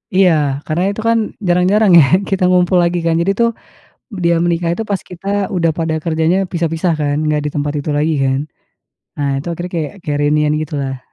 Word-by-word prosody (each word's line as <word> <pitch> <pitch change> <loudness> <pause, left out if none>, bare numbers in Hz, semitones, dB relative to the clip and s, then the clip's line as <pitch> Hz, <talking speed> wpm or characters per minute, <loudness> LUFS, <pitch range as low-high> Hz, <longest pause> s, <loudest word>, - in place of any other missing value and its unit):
Iya, 185 -2 +5 0.4
karena 165 +3 0
itu 205 - -6
kan 230 0 +3 0.3
jarang-jarang 185 +4 +3
ya - - +7 0.3
kita 190 -1 0
ngumpul 180 0 +3
lagi 175 0 0
kan, 165 - +2
jadi 195 +3 +1
tuh 235 0 +4 0.7
dia 170 0 +3
menikah 170 0 0
itu 225 - -3
pas 200 - 0
kita 180 +2 -11 0.3
udah 165 -2 +2
pada 160 -1 -1
kerjanya 160 +2 +1 0.2
pisah-pisah 165 0 0
kan, 145 -1 0
nggak 150 -1 +1
di 150 - -2
tempat 145 0 -1
itu 150 - -4
lagi 155 +2 +1
kan. 135 0 +1 0.8
Nah, 145 -1 -1
itu 145 - -8
akhirnya 175 +2 -5
kayak 155 -3 -2
kayak 145 -1 -2
reunian 150 0 +2
gitu 155 0 -6
lah. 135 -1 -4
165 Hz, 195 wpm, -16 LUFS, 150-180 Hz, 0.8 s, ya